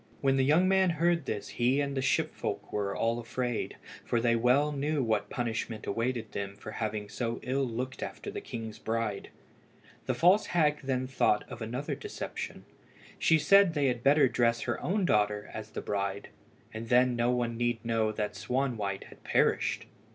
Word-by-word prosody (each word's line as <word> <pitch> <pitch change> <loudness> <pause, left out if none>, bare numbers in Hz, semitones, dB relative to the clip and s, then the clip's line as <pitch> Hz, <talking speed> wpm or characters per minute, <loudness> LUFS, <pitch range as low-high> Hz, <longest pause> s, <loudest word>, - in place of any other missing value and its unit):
When 135 -1 +2
the 135 - +3
young 155 +7 +4
man 190 -1 +4
heard 170 -2 +2
this 105 -2 -3
he 125 +3 +1
and 140 -1 0
all - - -5
the - - +1
ship 130 - +1
folk - - -4
were 100 -1 -1
afraid, 115 +1 -2 0.3
for 120 - 0
they 115 0 +3
well 125 +6 +3
knew 145 0 0
what 110 -3 0
punishment 115 -2 -3
awaited 115 +1 -2
them 100 0 -4
for - - -9
having 105 -2 -3
so 115 +2 -3
ill 135 +1 0
looked 125 +3 -4
after - - -5
the - - -5
king's 110 -2 -7
bride. 110 -3 -2 0.8
The - - +1
false 185 +5 +4
hag 150 -3 +2
then 130 -2 -1
thought 130 -5 +2
of 115 - -8
another 125 +6 -3
deception. 420 0 -6 0.5
She 160 - +5
said 195 +1 +5
they 140 -2 +3
had 120 -1 -2
better 140 +1 +5
dress 115 -1 +1
her - - -2
own 195 +1 0
daughter 105 -5 +1
as 110 -1 -6
the - - -5
bride, 100 -1 -3 0.4
and 110 +1 -6
then 125 0 +4
no 120 0 +1
one 120 -2 0
need 120 -1 -1
know 115 -1 +1
that 105 -1 -3
Swanwhite 110 -3 -2
had - - -16
perished. - - +1
120 Hz, 180 wpm, -30 LUFS, 110-140 Hz, 0.8 s, She